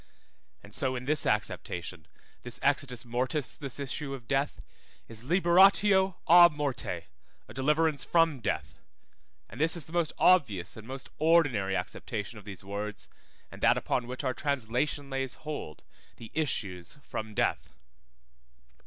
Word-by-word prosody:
And 100 - -15
so 130 +2 -1
in 125 0 -5
this 150 +2 +2
acceptation, 90 -5 -2 0.3
this 120 - -4
exitus 140 -4 0
mortis, 125 +4 -2
this 140 -2 -6
issue 140 0 -3
of 120 -3 -13
death 135 +3 -1 0.4
is 115 -1 -7
liberatio 190 +4 +5
á 175 +1 +9
morte, 145 -4 -3 0.4
a - - -11
deliverance 150 +2 +2
from 165 -5 +3
death, 115 - -3 0.7
and 125 - -8
this 165 +2 +4
is 160 - -4
the 160 - -13
most 170 -3 +1
obvious 110 - +3
and 110 0 -11
most 130 0 -8
ordinary 145 - +3
acceptation 105 +4 -4
of 100 - -16
these 100 -3 -8
words, 100 +2 -4 0.4
and - - -11
that - - +5
upon 120 - -1
which 125 +3 -5
our 130 -2 0
translation 140 +1 -1
lays 135 -1 -2
hold, 150 - -7 0.3
the 115 - -11
issues 100 - -2
from 110 -1 -6
death. - - 0
135 Hz, 145 wpm, -29 LUFS, 110-155 Hz, 0.7 s, á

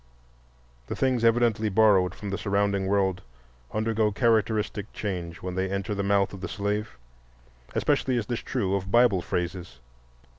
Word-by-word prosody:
The - - -4
things 130 -3 +1
evidently 115 -2 +3
borrowed 95 -3 +4
from 100 -2 -6
the 100 - -2
surrounding 100 -1 0
world 95 -2 +1 0.5
undergo 110 0 +1
characteristic 110 -2 0
change 90 -5 -5
when 90 0 -4
they 95 +1 -1
enter 100 +2 -2
the 100 - -2
mouth 100 0 +1
of 95 - -8
the 95 - -3
slave. 105 - -3 0.8
Especially 130 -2 +1
is 115 - -1
this 120 +2 -3
true 95 -1 -2
of 95 -1 -2
Bible 120 -4 +4
phrases. 90 -5 -4
100 Hz, 150 wpm, -26 LUFS, 95-110 Hz, 0.8 s, borrowed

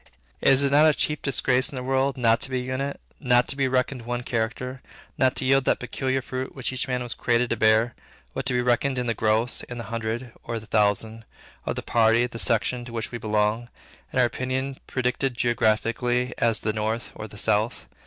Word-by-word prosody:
Is 135 +1 +5
it 140 - +2
not 150 +2 +6
the 155 -2 +5
chief 150 -1 0
disgrace 130 -1 +1
in 145 - -9
the 125 - -4
world, 135 +1 +1
not 115 -2 +3
to - - -2
be 130 -1 -1
an - - -6
unit; 135 +2 -3 0.2
not 125 -3 +3
to - - -2
be 135 -1 +1
reckoned 130 0 0
one 120 +1 -3
character; 125 +3 -3 0.3
not 130 0 +2
to - - +1
yield 135 +1 +4
that - - +3
peculiar 130 +1 -2
fruit 130 0 -5
which 130 -1 -3
each 130 - -2
man 125 -1 -1
was 120 -1 0
created 120 0 +1
to - - +2
bear, 110 +2 +3 0.4
but 135 - -3
to 130 - 0
be 125 0 +1
reckoned 125 +2 +1
in 125 - -1
the 115 - 0
gross, 110 +2 +1
in 125 - -8
the 115 - -5
hundred, 115 +2 -3
or 115 - -4
the 110 - -8
thousand, 110 +1 +1 0.4
of - - -1
the - - -5
party, 115 +1 +3
the 120 -1 -6
section, 120 +2 +1
to 120 - -9
which 115 -1 -4
we 120 - -5
belong; 110 +2 0 0.4
and - - 0
our 125 - +6
opinion 130 +2 -2
predicted 130 0 -1
geographically, 120 +2 +1
as 115 -2 +2
the 110 - -1
north, 110 +2 -2
or 110 - -7
the 105 - -13
south? 110 +2 +1
125 Hz, 220 wpm, -25 LUFS, 115-130 Hz, 0.4 s, not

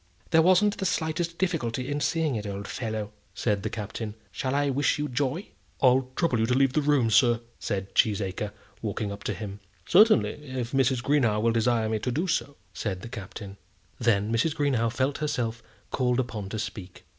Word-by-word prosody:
"There 160 0 +6
wasn't 185 +4 +4
the 190 - -1
slightest 165 0 -1
difficulty 130 -9 -1
in 145 +1 -1
seeing 160 -5 +1
it, 105 -1 -3
old 100 0 -5
fellow," 110 -3 -4 0.2
said 105 -3 0
the - - -2
Captain. 110 0 -5 0.2
"Shall 130 +7 -2
I 145 -1 +2
wish 140 +3 +2
you 150 0 -1
joy?" 145 +7 -2 0.3
"I'll 130 0 +4
trouble 160 -9 +1
you 110 - +2
to 125 - +2
leave 135 -1 +3
the 155 - +2
room, 140 -6 +3
sir," 120 +2 +5 0.2
said 100 -2 -3
Cheesacre, 100 -1 +1 0.3
walking 105 -1 -2
up 100 - -8
to - - 0
him. 100 -2 -6 0.3
"Certainly, 210 -4 +5
if 130 -4 -4
Mrs. 130 -2 +2
Greenow 125 -7 +2
will 115 +2 +2
desire 115 0 +2
me 110 0 0
to 125 - -2
do 160 +9 0
so," 160 -5 -1 0.2
said 95 0 -3
the 120 - -7
Captain. 100 -2 -8 0.4
Then 110 -2 +2
Mrs. 145 +7 +1
Greenow 130 -7 +1
felt 135 +3 0
herself 115 -6 -2 0.3
called 125 -1 +1
upon 110 -6 -3
to 110 - -4
speak. 95 -4 -6
120 Hz, 190 wpm, -27 LUFS, 110-145 Hz, 0.4 s, There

